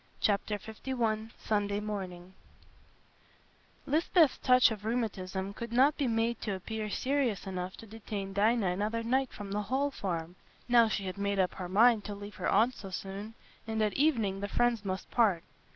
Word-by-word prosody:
Chapter 210 0 +1 0.3
LI 225 -4 -1
Sunday 205 -1 0
Morning 190 -4 -6 1.5
Lisbeth's 315 0 +3
touch 250 -2 +5
of 210 -2 -5
rheumatism 200 -4 -2
could 235 +2 -6
not 270 +5 +4
be 280 - 0
made 230 0 0
to 205 -3 -2
appear 215 +3 -4
serious 255 -3 0
enough 185 -1 -4
to - - -10
detain 205 -2 -6
Dinah 210 -1 +2
another 215 +5 -1
night 260 +3 +1
from 205 -1 -8
the 205 +1 0
Hall 265 +7 0
Farm, 175 -5 -4 0.3
now 240 -2 +6
she 205 - -2
had 185 +1 -5
made 200 0 0
up 185 -2 +2
her 180 -2 -6
mind 220 +3 +5
to 205 - -5
leave 205 +1 -9
her - - -1
aunt 230 +5 +4
so 195 -4 -9
soon, 195 +4 -6 0.3
and 220 0 -2
at 210 - +1
evening 230 -10 +1
the 200 - -3
friends 240 0 +1
must 190 -1 -4
part. 205 -8 +3
210 Hz, 170 wpm, -31 LUFS, 195-235 Hz, 1.5 s, now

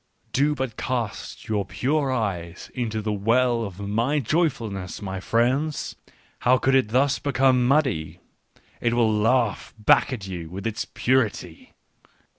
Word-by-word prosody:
" - - -41
Do 145 +3 +2
but 130 -4 -4
cast 120 -5 -4
your 105 -2 0
pure 130 +9 0
eyes 95 -8 -3
into 110 -4 -2
the 105 0 -1
well 115 +3 +2
of 100 -3 -7
my 115 +8 0
joyfulness, 120 - -1
my 95 -2 -5
friends! 130 +9 0 0.4
How 130 +1 +4
could 135 +1 +1
it 130 -5 +3
thus 135 +4 +2
become 130 -3 +3
muddy! 130 - +1 0.6
It 120 0 +1
will 115 -2 +3
laugh 115 +1 +1
back 105 +5 +4
at 110 -7 -4
you 85 -4 -6
with 95 +3 -7
its 110 -1 -2
purity. 110 -10 -1
115 Hz, 145 wpm, -24 LUFS, 100-130 Hz, 0.6 s, How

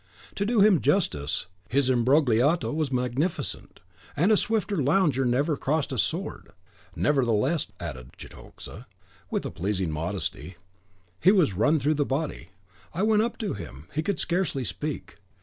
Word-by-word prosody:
To 200 - -2
do 230 -2 +3
him 200 -5 +5
justice, 75 - 0 0.2
his 135 +1 +2
imbrogliato 130 +4 +3
was 155 -3 -1
magnificent, 130 +7 -2 0.4
and 175 +8 +3
a - - +6
swifter 210 -4 0
lounger 145 -2 +2
never 140 +6 +1
crossed 145 +2 -1
a 130 - -2
sword; - - -3 0.4
nevertheless," 135 +1 +1
added 65 -7 -7
Cetoxa, 120 +5 -11 0.4
with - - -2
a - - -4
pleasing 95 -2 -2
modesty, 90 +3 -4 0.6
"he 185 - +6
was 180 - +3
run 115 - +3
through 150 +2 +1
the - - +5
body. 135 - -3 0.5
I 185 - 0
went 215 0 +4
up 230 +1 -2
to 215 - -3
him; 80 -7 -9
he 155 - 0
could 180 +1 -2
scarcely 170 -6 -1
speak. 150 +5 -5
140 Hz, 150 wpm, -26 LUFS, 115-170 Hz, 0.6 s, a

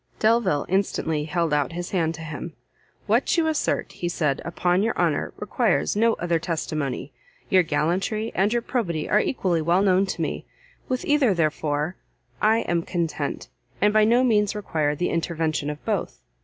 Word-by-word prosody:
Delvile 220 -10 +2
instantly 160 -5 0
held 165 -1 0
out 145 +2 +1
his 175 +1 -5
hand 165 -3 0
to 160 - -10
him; 160 +1 -6 0.5
"What - - +2
you 330 - +3
assert," 315 -2 0
he 175 - -4
said, 150 -5 0
"upon 175 +2 +1
your 225 - 0
honour, - - +1
requires - - 0
no 225 +2 +3
other 170 -3 0
testimony. 155 -4 -3 0.4
Your 185 - +6
gallantry 180 +8 -1
and 195 +3 +2
your 240 0 0
probity 175 -13 -2
are 210 - +4
equally 185 - 0
well 175 +5 +2
known 190 0 +3
to - - -3
me; - - -4 0.4
with 255 0 -1
either, 280 -9 +3
therefore, 155 0 -1 0.4
I 220 +2 +4
am 170 -1 0
content, 165 -4 -3 0.3
and 210 +1 +3
by 215 0 +5
no 235 +4 +4
means 210 -4 +2
require 155 -8 -1
the 175 - -1
intervention 160 -3 -1
of 150 0 -7
both." - - -2
175 Hz, 170 wpm, -24 LUFS, 155-210 Hz, 0.5 s, Your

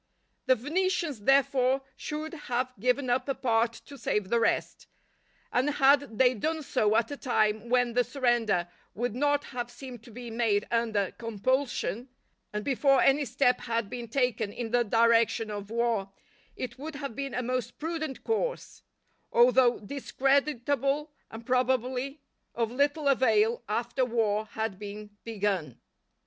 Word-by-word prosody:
The 260 - +6
Venetians, 325 - -1
therefore, 270 -1 +3
should 310 +1 -5
have 255 -4 -2
given 250 +4 +1
up 255 +2 0
a 275 - 0
part 230 -2 +1
to 280 -1 -12
save 210 -3 -1
the 235 - +3
rest; 230 - 0 0.7
and 255 +4 +2
had 280 -4 +3
they 255 -1 +5
done 315 +7 -2
so 215 -6 +1
at 230 +4 +1
a 285 - -4
time 220 -3 0
when 245 -1 +2
the 245 +1 +3
surrender 240 -8 +1 0.3
would 240 +1 -2
not 290 +3 +1
have 245 -2 -5
seemed 250 -2 -10
to - - -13
be 240 +1 -8
made 225 -3 +1
under 225 -4 +1
compulsion, 240 +2 -1 0.4
and 210 0 -4
before 275 0 +3
any 280 +3 +4
step 250 0 +2
had 230 -3 -2
been 240 -1 -5
taken 230 -4 0
in 225 0 -5
the 245 0 +3
direction 230 0 +3
of 205 -1 -6
war, 230 -4 0 0.5
it 250 0 -6
would 310 +2 -6
have 275 -5 -5
been 275 -1 -4
a 250 - -1
most 245 -1 -3
prudent 315 -3 -4
course; 485 +2 -2 0.5
although 245 0 +5
discreditable 275 +3 0 0.2
and 225 +1 -10
probably 255 +2 0 0.3
of 230 -1 -1
little 285 +3 +1
avail 230 -4 +3
after 235 +4 0
war 220 -3 0
had 220 -3 -4
been 210 0 -8
begun. 200 - -2
245 Hz, 150 wpm, -28 LUFS, 225-275 Hz, 0.7 s, The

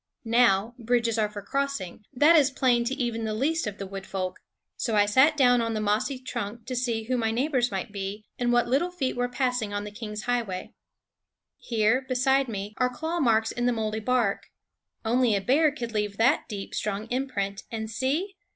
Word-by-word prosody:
Now, 230 -2 +3
bridges 235 -1 +1
are 210 -1 +2
for 205 -1 -8
crossing; 275 -7 -3
that 295 +5 +5
is 285 -4 +5
plain 250 -3 +2
to 260 +3 -1
even 235 -4 -2
the 215 -1 -2
least 305 +4 0
of 205 -1 -5
the 195 - -5
wood 195 0 -7
folk; 185 -1 -3 0.4
so 230 -3 -1
I 205 -1 +5
sat 265 +9 +4
down 245 -3 +5
on 230 -1 -1
the - - -1
mossy 215 +6 0
trunk 235 -3 -5
to 255 - -4
see 235 -3 -1
who 250 +3 -1
my 225 -1 +1
neighbors 250 +1 +1
might 195 +1 -4
be, 200 +1 -5
and 240 -1 +1
what 240 -1 +3
little 280 +8 +1
feet 295 -8 -2
were 245 0 -1
passing 245 -5 -1
on 205 - -2
the 210 - -7
King's 210 0 -6
highway. 230 -7 -2 0.9
Here, 225 +2 +2
beside 265 +1 +2
me, 205 -2 -5
are 250 0 +2
claw 320 +7 -3
marks 225 -5 +3
in 245 0 -1
the 245 - +3
moldy 220 -1 -2
bark. 230 -3 0 0.6
Only 240 -1 +3
a - - +2
bear 285 +9 +3
could 240 -5 -5
leave 210 -2 -2
that 250 +5 +2
deep, 200 -3 -6
strong 210 0 -2
imprint. 205 -7 -2
And 220 -1 -3
see! 270 - -1
235 Hz, 200 wpm, -27 LUFS, 210-255 Hz, 0.9 s, that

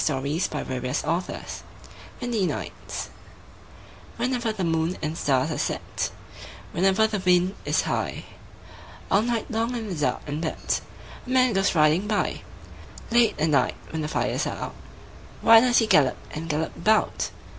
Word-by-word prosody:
CHARLES 140 - 0
MACKAY 130 +7 -3 0.6
WINDY 225 -6 0
NIGHTS - - -5 1.1
Whenever 245 -3 0
the 200 -3 -3
moon 165 +1 0
and 155 0 -3
stars 140 -1 +1
are 155 - -3
set, - - -2 0.6
Whenever 195 +4 +3
the 215 -2 -1
wind 180 0 +3
is - - +2
high, - - -2 0.9
All 200 - +5
night 235 +1 -2
long 230 +2 0
in 225 -3 -4
the - - -3
dark 140 -5 0
and 150 +2 -4
wet. 160 - -1 0.5
A - - -8
man 255 -2 +4
goes 195 -1 +2
riding 155 +6 +4
by, 210 -1 0 0.7
Late 235 -2 +4
at 160 - +2
night 145 - +2 0.2
when 160 - -3
the 150 - -2
fires - - -1
are - - -4
out, - - -6 0.7
Why 225 0 +9
does 245 0 +3
he 225 - +5
gallop 145 - +4
and 165 +2 -6
gallop 155 +2 -1
about? 215 0 +1
185 Hz, 150 wpm, -25 LUFS, 155-220 Hz, 1.1 s, Why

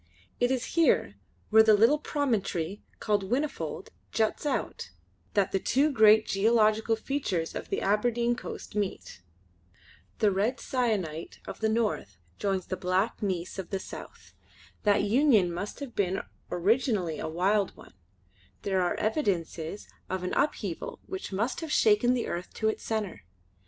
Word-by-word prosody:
It 245 - +3
is 255 -2 -2
here, 335 -1 +3 0.4
where 220 +1 +8
the 220 -1 +6
little 230 +8 +5
promontory 205 - -1 0.2
called 210 -2 +1
Whinnyfold 260 +9 -2 0.2
juts 220 +6 0
out, 265 - -2 0.5
that 200 -2 +2
the 195 - +1
two 280 +9 +2
great 220 -3 +6
geological 220 +2 +3
features 220 - -2
of - - -6
the - - -1
Aberdeen 235 +4 +1
coast - - -8
meet. 200 - -3 1.0
The 210 - +3
red 210 +7 0
sienite 205 - -2
of - - -7
the 220 - +1
north 215 - -1 0.2
joins 195 -2 -1
the 185 - -4
black 185 +5 0
gneiss 185 -2 -2
of 185 - -5
the 195 - -1
south. - - -10 0.5
That 205 -1 +4
union 215 - +4
must 200 +10 -5
have 270 -4 -6
been 190 -1 0 0.3
originally 195 - +1
a - - -3
wild 195 +5 +1
one; - - -15 0.7
there 190 -2 +1
are 175 - +1
evidences 195 - -2 0.2
of 185 -1 -2
an 180 - -2
upheaval 295 - -1
which 380 - -6
must 225 - -1
have 320 -2 -5
shaken 225 +2 +4
the 240 - -1
earth 175 +1 -4
to 220 - +1
its - - -3
centre. 215 - -3
210 Hz, 150 wpm, -28 LUFS, 190-240 Hz, 1.0 s, where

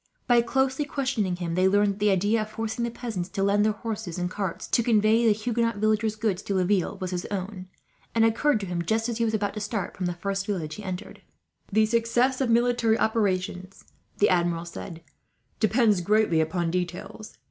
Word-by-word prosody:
By 240 -1 +5
closely 265 +4 0
questioning 260 -10 -1
him, 175 -2 -4
they 185 +2 +3
learned 205 +1 +3
that 195 - -14
the 210 0 +3
idea 205 +4 +2
of 215 - -5
forcing 225 +1 -3
the 235 - 0
peasants 225 -7 -5
to 195 - -2
lend 200 +1 +3
their 215 - +3
horses 215 -4 -5
and 180 0 -2
carts, 195 -4 -4
to - - +3
convey 225 0 +3
the - - +6
Huguenot 230 +2 0
villagers' 215 +1 +1
goods 215 -4 -1
to 200 - -3
Laville, 185 0 +1
was 185 -1 -4
his 180 0 -3
own, 190 -1 -5 0.5
and 225 -1 +5
occurred 230 +3 +2
to - - -3
him 175 -2 -2
just 220 +7 0
as 235 -1 -3
he 230 - +2
was 220 -1 0
about 205 -1 -1
to 210 - -5
start 210 -2 -3
from 185 - -2
the 175 - -3
first 195 +2 -3
village 170 -7 -3
he 210 - -8
entered. 185 0 -6 0.5
"The 215 +2 +4
success 235 +4 +1
of 260 - +1
military 235 -1 +3
operations," 190 -4 -1 0.3
the 205 - +4
Admiral 170 -2 +1
said, 170 -1 -8 0.6
"depends 215 -3 +3
greatly 205 -3 +3
upon 165 +1 -1
details. 180 - -5
210 Hz, 200 wpm, -26 LUFS, 185-225 Hz, 0.6 s, the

